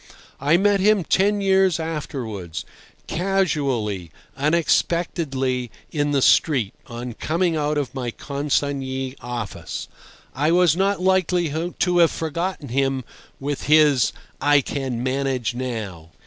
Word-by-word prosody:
I 145 +5 +4
met 200 +1 +3
him 205 -1 +4
ten 200 +4 +2
years 190 -3 +3
afterwards, 125 - -5 0.4
casually, 140 - -1 0.3
unexpectedly, 145 -4 0 0.2
in 145 -2 0
the 140 -2 +2
street, 130 - +3
on 120 0 -6
coming 165 +7 0
out 150 0 0
of 140 -3 -2
my 130 -3 -3
consignee 135 -1 -2
office. 120 -4 -5 0.5
I 145 +4 +1
was 175 -3 +4
not 195 +1 +1
likely 180 -2 +2 0.3
to 180 -1 +2
have 170 -2 +6
forgotten 165 -1 -3
him 135 +1 0 0.4
with 140 +1 -3
his 150 -5 +5 0.3
"I 145 0 +5
can 130 -3 -3
manage 130 -3 -1
now." 110 -10 -5
145 Hz, 120 wpm, -22 LUFS, 130-170 Hz, 0.5 s, have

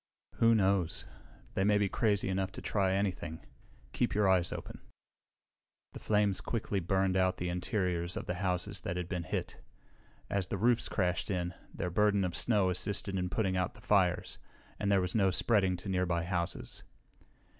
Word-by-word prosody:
"Who 115 0 +5
knows? 95 -4 +2 0.5
They 95 - +1
may 105 +1 +4
be 100 -1 +2
crazy 105 -1 +1
enough 95 0 -1
to - - -6
try 95 -3 +1
anything. 95 -5 -2 0.5
Keep - - 0
your 105 -1 +3
eyes 90 -2 +3
open." - - -7 1.1
The - - -7
flames 105 -2 +1
quickly 105 -3 -2
burned 95 +1 +1
out 95 0 +2
the 90 - -2
interiors 90 -1 -1
of - - -4
the 90 - -2
houses 90 -2 -1
that 90 -4 -3
had 90 -1 -3
been 90 -1 -2
hit. - - -4 0.7
As 100 -3 -1
the 100 - -2
roofs 120 +3 +2
crashed 90 -3 0
in, 90 -2 -1 0.2
their 90 - -3
burden 100 +1 +3
of 90 -2 -2
snow 100 -6 +2
assisted 100 +1 -2
in 90 -1 -1
putting 95 -2 0
out 90 -1 -1
the - - -14
fires, 95 -4 +1 0.4
and 100 - 0
there 100 -1 +4
was 90 0 -2
no 100 -4 +3
spreading 95 -1 +2
to - - -9
nearby 90 -3 0
houses. 85 0 -3
95 Hz, 175 wpm, -32 LUFS, 90-100 Hz, 1.1 s, Who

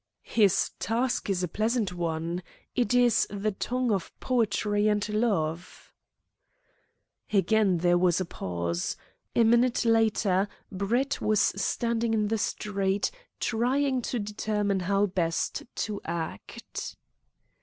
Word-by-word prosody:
"His 200 -4 +3
task 235 +3 -1
is 185 -2 0
a - - +1
pleasant 215 +1 0
one. 170 0 -2 0.3
It 245 -1 +1
is 245 -2 +4
the 205 +1 -1
tongue 250 +4 -1
of 195 -4 -1
poetry 210 -3 +1
and 210 -1 +1
love." 185 -7 -1 1.4
Again 200 -1 +3
there 175 +1 +3
was 180 -1 +3
a 185 - -1
pause. 85 - -3 0.4
A 235 - +5
minute 235 +2 +3
later 215 -4 +3 0.2
Brett 230 +8 0
was 215 -1 +2
standing 230 +3 +1
in 210 -1 +1
the 225 0 0
street 200 -1 -1 0.3
trying 255 +3 +1
to 245 - -1
determine 205 -1 -1
how 195 +3 +2
best 175 -4 -1
to 210 -2 -3
act. 165 -1 -5
205 Hz, 120 wpm, -28 LUFS, 185-225 Hz, 1.4 s, A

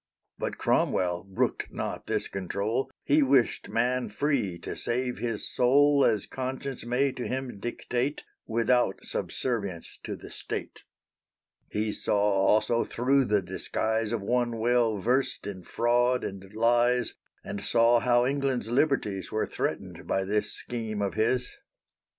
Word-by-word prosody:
But - - -3
Cromwell 90 -1 +1
brooked 95 -1 -1
not - - -4
this - - 0
control; 100 +7 -2
He 150 +2 +4
wished 135 -3 +2
man 125 +1 +1
free 120 - 0
to - - -6
save 125 +1 -2
his 115 -2 -2
soul 140 +3 +4
As 105 -3 +2
conscience 130 0 -4
may 125 +4 +1
to 125 -1 -5
him 130 -5 -4
dictate, 125 +5 -2 0.2
Without 115 -2 +1
subservience 100 -9 -3
to - - -5
the - - -11
State. - - -5 0.9
He 105 0 -1
saw - - 0
also 105 +3 +3
thro' 135 +3 +2
the 105 -3 +2
disguise 110 +4 -1
Of 115 -4 -2
one 120 +1 0
well 115 -1 +2
versed 125 +7 0
in 100 -2 -5
fraud 120 +6 +1
and 95 0 -6
lies, 120 +1 +3 0.3
And 100 - -5
saw 115 +2 +4
how 120 0 +3
England's 135 -4 0
liberties 120 -7 +1
Were 110 - 0
threatened - - -4
by 95 - +1
this 105 +2 0
scheme 110 -4 -3
of 100 - -1
his. 125 +4 0
120 Hz, 140 wpm, -28 LUFS, 105-125 Hz, 0.9 s, He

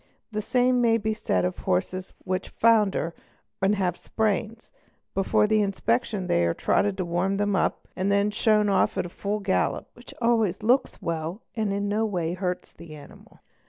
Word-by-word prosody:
The 215 0 -2
same 250 +3 +2
may 230 -1 +4
_ - - -12
be 220 0 +1
said 95 - 0
of 90 - -3
horses 185 - -1
which 185 0 -2
founder 210 -7 +2 0.5
and 195 +2 +3
have 185 -3 0
spavins; 220 +2 -2 0.4
before 195 +2 +2
the 215 0 +3
inspection 210 +1 0
_ - - -6
they 85 - +2
are 85 0 +1
trotted 200 -2 +1
to 185 - -1
warm 175 +3 0
them 205 0 +1
up - - 0
and 190 +1 -1
are 200 - +2
then 200 +1 +2
shown 210 -1 +3
off 195 -1 +2
at 175 - -2
full 205 +3 -3
gallop, 195 -1 0
_ - - -50
which 240 - -13
always 225 -5 +1
looks 250 +5 +1
well 165 +5 -3
and 215 -3 0
in 200 +1 -1
no 210 +2 +1
way 175 -5 -2
hurts 180 0 -4
the 165 -2 -11
animal. 145 - -15
200 Hz, 195 wpm, -26 LUFS, 180-220 Hz, 0.5 s, may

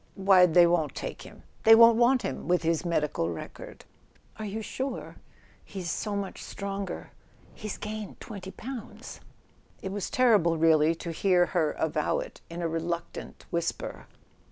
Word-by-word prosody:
" - - -34
"Why, 190 -2 +6
they 175 +1 +6
won't 170 -5 +1
take - - -5
him—they 225 0 +2
won't 230 0 +8
want 245 +1 +4
him... - - -4
with 180 -1 +2
his 165 0 +1
medical 150 - 0
record." 85 - -8 0.5
"Are 215 - -5
you 215 +2 -4
sure? 260 +3 -5 0.5
He's 185 -4 -5
so 210 +4 -3
much 200 -1 -4
stronger... 200 -2 -5 0.4
He's 215 -2 -6
gained 215 -1 -6
twenty 195 -4 -8
pounds. 240 +3 -8 0.3
.." - - -33
It 190 - -3
was 200 -1 -3
terrible, 215 - +4
really, 160 0 +4
to 170 +1 -6
hear 180 +1 +3
her 160 -4 +2
avow 160 - 0
it - - -7
in 170 +1 -5
a - - +1
reluctant 170 +1 -5
whisper! 170 0 -3
185 Hz, 155 wpm, -28 LUFS, 165-215 Hz, 0.5 s, won't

